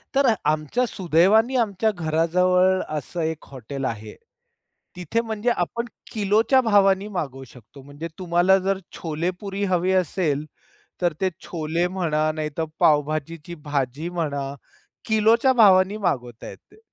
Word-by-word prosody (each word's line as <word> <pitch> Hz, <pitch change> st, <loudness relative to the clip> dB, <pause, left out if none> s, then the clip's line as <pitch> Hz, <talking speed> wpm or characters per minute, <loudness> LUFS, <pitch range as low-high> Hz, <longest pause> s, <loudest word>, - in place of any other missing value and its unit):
तर 270 Hz, -4 st, +4 dB
आमच्या 155 Hz, -, 0 dB
सुदैवानी, 200 Hz, +7 st, +3 dB
आमच्या 220 Hz, -2 st, +1 dB
घराजवळ 180 Hz, +2 st, +2 dB, 0.2 s
असं 170 Hz, +4 st, -5 dB
एक 160 Hz, -1 st, -3 dB
हॉटेल 135 Hz, +1 st, -6 dB
आहे. 110 Hz, -3 st, -5 dB, 0.8 s
तिथे 180 Hz, +6 st, -1 dB
म्हणजे 220 Hz, +1 st, -2 dB
आपण 235 Hz, +3 st, -1 dB, 0.3 s
किलोच्या 220 Hz, +5 st, +2 dB
भावानी 200 Hz, -3 st, +3 dB
मागवू 135 Hz, -9 st, -5 dB
शकतो. 125 Hz, +2 st, -15 dB
म्हणजे 145 Hz, +4 st, -8 dB
तुम्हाला 180 Hz, +2 st, +3 dB
जर 195 Hz, +1 st, -1 dB, 0.2 s
छोले 165 Hz, +1 st, -2 dB
पुरी 200 Hz, 0 st, -4 dB
हवी 180 Hz, +1 st, +1 dB
असेल, 165 Hz, -5 st, 0 dB, 0.6 s
तर 175 Hz, -2 st, +1 dB
ते 190 Hz, -, +2 dB, 0.2 s
छोले 165 Hz, +1 st, -1 dB
म्हणा, 155 Hz, -4 st, 0 dB
नाहीतर 155 Hz, +1 st, -3 dB
पावभाजीची 155 Hz, +2 st, 0 dB
भाजी 145 Hz, +2 st, -2 dB
म्हणा, 145 Hz, -5 st, -3 dB, 0.5 s
किलोच्या 225 Hz, +4 st, +3 dB
भावानी 200 Hz, -3 st, +5 dB
मागवता 125 Hz, -, -2 dB
येते. -, -, -16 dB
175 Hz, 125 wpm, -23 LUFS, 150-200 Hz, 0.8 s, भावानी